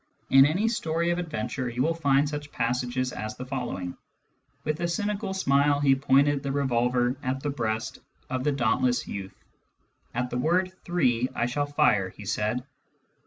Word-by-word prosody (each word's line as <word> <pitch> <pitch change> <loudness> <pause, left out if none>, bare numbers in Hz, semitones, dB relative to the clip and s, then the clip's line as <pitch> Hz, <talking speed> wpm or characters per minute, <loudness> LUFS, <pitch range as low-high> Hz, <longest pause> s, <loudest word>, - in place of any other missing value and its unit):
In 135 +1 +8
any 185 +9 +1
story 170 -6 0
of 175 - 0
adventure 130 -6 -3
you 120 +2 -1
will 165 - +2
find 145 -3 +2
such 145 0 -5
passages 125 +1 -1
as 110 0 -5
the 125 - -6
following: 120 -9 -4 0.3
" - - -43
With 155 +1 -2
a 170 - 0
cynical 205 +3 -2
smile 145 -5 +3
he 140 -2 +4
pointed 140 +1 +3
the 140 -1 -3
revolver 125 -2 +1
at 135 +1 -2
the 145 - 0
breast 110 -4 -2 0.3
of 130 0 -2
the 150 - +2
dauntless 125 -1 +1
youth. 95 -1 -6 0.8
*At 125 +1 -1
the 125 - -1
word 180 +6 +2
three 130 -8 +1
I - - +1
shall 145 +4 -1
fire,' 145 -10 +2
he 100 - -12
said. 110 +4 -1
135 Hz, 170 wpm, -27 LUFS, 125-150 Hz, 0.8 s, In